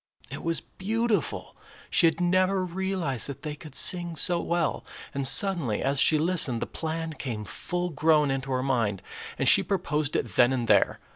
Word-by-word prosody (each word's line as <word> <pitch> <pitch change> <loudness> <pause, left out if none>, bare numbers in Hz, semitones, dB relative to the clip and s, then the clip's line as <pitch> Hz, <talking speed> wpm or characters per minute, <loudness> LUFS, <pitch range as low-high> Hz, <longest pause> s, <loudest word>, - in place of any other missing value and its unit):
It - - -7
was 165 -1 -1
beautiful. 225 +3 -3 0.4
She 170 - +5
had 160 - -1
never 185 +1 +1
realized 180 -7 -2
that 140 -2 -9
they 150 -1 -4
could 150 -2 -12
sing 175 -2 +3
so 175 +3 +3
well, 170 -2 -2 0.3
and, 140 -2 +2
suddenly, 170 - +2
as 135 0 +1
she 155 - +5
listened, 155 -7 0
the - - -3
plan 160 0 -5
came 115 -8 -6
full 175 - -4
grown 150 -1 +2
into 135 0 -4
her 130 0 -1
mind, 115 -8 -1 0.3
and - - -1
she - - +7
proposed 155 -6 -2
it 120 - -3
then 125 +1 +5
and 120 -3 -2
there. - - +3
160 Hz, 180 wpm, -26 LUFS, 135-180 Hz, 0.4 s, she